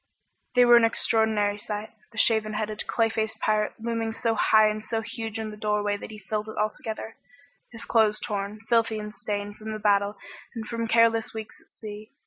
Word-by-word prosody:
They 250 0 +7
were 240 0 +8
an 235 - +4
extraordinary 220 -2 +2
sight. 210 +1 -5 0.2
The 230 - -15
shaven 220 -1 +3
headed, 215 0 -3
clay 225 -1 +2
faced 220 -1 -2
pirate 215 0 +1
looming 230 0 -2
so 230 0 0
high 215 0 +5
and 215 0 -2
so 225 0 -2
huge 225 -1 -5
in 220 -1 -4
the - - -8
doorway 210 -1 0
that 205 - -8
he 215 - -9
filled 210 +2 -4
it - - -8
altogether, 220 +1 -3 0.5
his 230 -1 -8
clothes 215 -2 +3
torn, 205 +1 -4
filthy 230 -1 +2
and 210 0 -6
stained 205 -1 -4
from 220 0 -6
the - - -3
battle 205 -1 +2 0.4
and 225 -1 -4
from 230 +1 -3
careless 225 -1 +3
weeks 220 -1 -8
at - - -28
sea. 215 +2 -10
215 Hz, 195 wpm, -26 LUFS, 210-225 Hz, 0.5 s, were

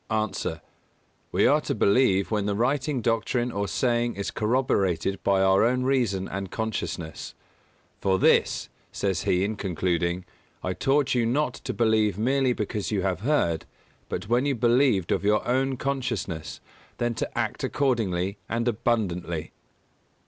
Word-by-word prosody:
_ 110 -2 -1
A. - - -8 0.7
We - - +3
are - - +4
to - - -2
believe 100 -3 +3
when 105 -2 0
the 100 - 0
writing 130 +4 0
doctrine 120 +2 0
or 100 -1 -2
saying 120 +2 0
is 100 0 -3
corroborated 100 -6 0
by 95 -1 +3
our 95 +1 +4
own 125 +2 +2
reason 120 -8 +1
and 100 -1 -5
consciousness. 95 -7 -4 0.6
"For 95 -1 +2
this," - - +3 0.2
says 95 -2 -1
he 90 +1 +2
in 105 +1 -2
concluding, 90 -1 -1 0.4
"I 90 - -1
taught 140 +4 +1
you 120 -2 +2
not 130 +1 +1
to - - -5
believe 110 -3 +2
merely 130 +3 +2
because 105 -2 -3
you 100 -3 0
have 95 -2 0
heard, 100 - 0 0.4
but - - -4
when 120 +5 +2
you 140 - +1
believed 120 -5 +3
of - - +1
your 105 +1 +2
own 130 +1 +1
consciousness, 120 - -3 0.4
then 120 0 0
to 115 - -4
act - - -2
accordingly 100 -9 0
and 115 +1 -1
abundantly." 95 -8 -1
110 Hz, 150 wpm, -26 LUFS, 95-125 Hz, 0.7 s, are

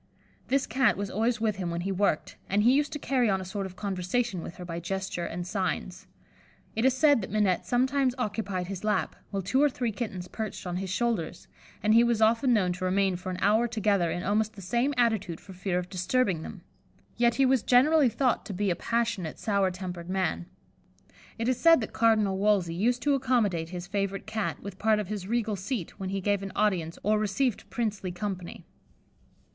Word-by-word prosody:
This 270 +1 +2
Cat 245 -1 +2
was 200 -1 -3
always 225 +3 0
with 215 -3 0
him 180 -3 -3
when 170 0 -3
he 195 +2 -2
worked, 195 -4 0
and 205 +2 +2
he 245 +3 +6
used 290 +1 +2
to - - -2
carry 260 -5 +1
on 190 -1 +1
a 190 - -6
sort 195 +1 -4
of 185 - -13
conversation 195 +1 -2
with 165 - -8
her 180 - -8
by 170 -1 -4
gesture 190 0 -3
and 175 +1 -5
signs. 190 +1 -3 0.7
It 225 +3 +1
is 265 -1 +4
said 290 -4 +5
that 190 - -6
Minette 200 -3 +1
sometimes 260 +1 +2
occupied 205 -6 -2
his 190 +1 -6
lap, 210 0 0
while 195 -2 -3
two 260 +9 +2
or 295 - +5
three 245 -3 -2
kittens 195 -5 -5
perched 215 -1 -5
on 180 0 -3
his 190 0 -4
shoulders; 205 -5 -2 0.4
and 215 +1 +4
he 230 +1 +7
was 235 -2 +2
often 230 +4 +3
known 190 -6 +2
to 185 +1 -4
remain 190 0 +2
for 180 +1 -6
an 180 - -3
hour 215 +4 +3
together 200 -6 +1
in 175 +2 -3
almost 215 +2 +1
the 205 - -11
same 240 +8 +1
attitude 220 -8 +1
for 190 - -12
fear 180 0 -2
of 180 0 -2
disturbing 185 0 0
them; - - -9 0.5
yet 235 0 +3
he 270 - +4
was 260 -2 +3
generally 270 +4 +5
thought 255 +1 +1
to 205 - -5
be 200 0 0
a - - 0
passionate, 230 -8 -1
sour 200 -3 +1
tempered 180 -1 -6
man. 185 -2 -1 0.9
It 230 0 -2
is 255 -1 +1
said 330 -2 +6
that 220 - -5
Cardinal 215 -4 +3
Wolsey 200 -5 +2
used 235 +8 0
to 290 - +3
accommodate 230 -11 +1
his 180 0 -6
favourite 195 +1 -2
Cat 220 -1 -3
with 200 -1 -8
part 220 0 +3
of 210 -3 -3
his 205 -3 -4
regal 225 -1 0
seat 195 0 -5
when 190 -1 -3
he 195 0 -2
gave 200 +1 +1
an 195 -1 -5
audience 180 -6 0
or 215 +1 +2
received 215 +3 -1
princely 210 -6 -2
company. 180 -1 -5
205 Hz, 210 wpm, -28 LUFS, 185-235 Hz, 0.9 s, he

